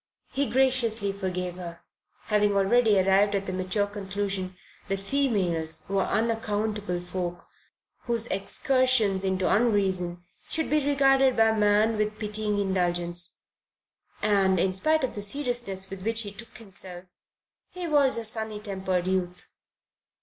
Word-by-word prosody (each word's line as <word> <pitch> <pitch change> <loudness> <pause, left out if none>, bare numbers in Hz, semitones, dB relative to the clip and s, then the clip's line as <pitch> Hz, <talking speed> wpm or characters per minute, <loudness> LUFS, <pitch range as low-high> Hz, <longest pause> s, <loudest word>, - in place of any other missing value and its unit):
He 275 +1 -1
graciously 235 -5 +2
forgave 180 -2 -4
her, 170 -2 -8 0.4
having 210 -1 +1
already 205 +1 +4
arrived 195 +2 +3
at 195 0 -1
the 185 - -4
mature 185 +2 0
conclusion 195 -2 -4 0.3
that 195 0 -1
females 195 - -1
were 195 0 0
unaccountable 210 -3 -1
folk 175 -1 -5 0.6
whose 235 -2 +1
excursions 225 -1 +1
into 190 -1 0
unreason 190 -6 +1 0.3
should 320 -2 -1
be 300 -1 +2
regarded 270 -2 +3
by 225 0 +5
man 215 +1 +3
with 210 0 -1
pitying 210 -1 -2
indulgence. 175 -2 0 0.8
And, 195 -3 +3
in 185 +2 +1
spite 310 +10 +1
of 260 - -1
the 205 - -4
seriousness 240 -5 -1
with 195 -1 -7
which 225 +3 +2
he 205 -2 -5
took 215 +2 -11
himself, 190 -4 -5 0.6
he 360 -1 -6
was 285 -5 +3
a 230 - -4
sunny 220 -1 +1
tempered 190 -3 -2
youth. 180 -1 -2
205 Hz, 135 wpm, -26 LUFS, 190-225 Hz, 0.8 s, by